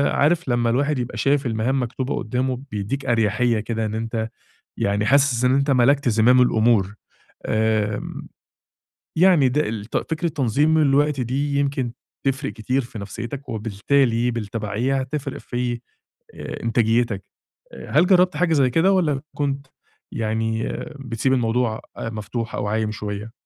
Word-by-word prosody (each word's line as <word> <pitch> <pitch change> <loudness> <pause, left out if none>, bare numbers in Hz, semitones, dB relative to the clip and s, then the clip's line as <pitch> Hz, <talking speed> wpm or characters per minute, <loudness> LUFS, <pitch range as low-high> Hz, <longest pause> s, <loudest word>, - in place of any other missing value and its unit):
عارف 160 0 +2
لما 120 -1 +2
الواحد 140 +2 +1
يبقى 125 0 -4
شايف 140 0 +2
المهام 120 +4 0
مكتوبة 130 +2 -3
قدامه، 125 +3 -2
بيدّيك 105 +7 -3
أريحية 115 0 +2
كده 110 0 -2
إن 110 0 -3
أنت 115 0 -3 0.5
يعني 100 +1 0
حاسس 135 -1 +3
إن 130 +1 +4
أنت 140 +1 +2
ملَكت 130 +1 +3
زمام 120 +4 +5
الأمور. 110 -4 +2 0.5
آمم، 110 -1 -1 0.9
يعني 170 -6 +5
ده 150 +2 0
الت 110 0 -4 0.2
فكرة 170 +2 0
تنظيم 150 +2 +2
الوقت 145 -1 +3
دي 140 +4 -1
يمكن 135 -4 -1 0.3
تفرِق 135 +1 -1
كتير 125 +4 -1
في 115 -2 -9
نفسيتك، 120 +7 -6
وبالتالي 115 +3 +1
بالتبعية 115 +4 -2
هتفرق 135 +1 -4
في، 120 -1 -3 0.5
آآ - - -7
إنتاجيتك. 115 -3 +1 0.5
آآ، - - -10
هل 155 +5 +5
جربت 180 -1 +4
حاجة 180 -2 +2
زي 135 -3 +3
كده 175 +9 +3
والّا 150 -8 +1
كنت 140 -1 -2 0.5
يعني 110 0 -1 0.3
بتسيب 125 0 -1
الموضوع 115 -2 0 0.2
آآ، 115 - -4
مفتوح 115 +2 -5
أو 105 - -2
عايم 110 0 0
شوية؟ 105 +1 -5
125 Hz, 140 wpm, -22 LUFS, 110-140 Hz, 0.9 s, زمام